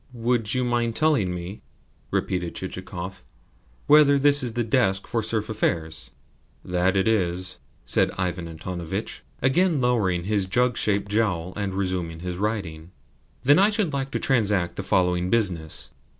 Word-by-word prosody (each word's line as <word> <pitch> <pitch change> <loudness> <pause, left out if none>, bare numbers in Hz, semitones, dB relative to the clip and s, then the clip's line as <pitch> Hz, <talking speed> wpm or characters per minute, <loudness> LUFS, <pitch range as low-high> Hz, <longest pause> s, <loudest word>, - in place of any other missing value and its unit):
"Would 120 -1 0
you 125 - +1
mind 120 -2 0
telling 150 - +2
me," 90 +3 -6 0.5
repeated 90 -2 -2
Chichikov, 95 0 -6 0.6
"whether 145 -1 +6
this 145 +1 +5
is 120 -3 -1
the 120 0 0
desk 110 -5 +1
for 115 - -1
serf 110 0 0
affairs?" 80 -7 -2 0.6
"It 95 +3 +1
is 90 -4 0
that," - - -21 0.2
said - - +3
Ivan 90 -2 -2
Antonovitch, 85 +1 -5 0.2
again 160 +4 +3
lowering 105 -9 +1
his 100 0 0
jug 125 +4 +1
shaped 100 -1 0
jowl, 95 -5 0
and 100 -2 -3
resuming 90 -4 -2
his 90 -1 -4
writing. 95 -6 -3 0.5
"Then 145 +5 +5
I 200 +2 +5
should 205 -8 0
like 135 -1 -2
to - - -3
transact 105 -8 +1
the - - -3
following 90 0 +1
business. 90 -9 0
100 Hz, 150 wpm, -24 LUFS, 90-120 Hz, 0.6 s, whether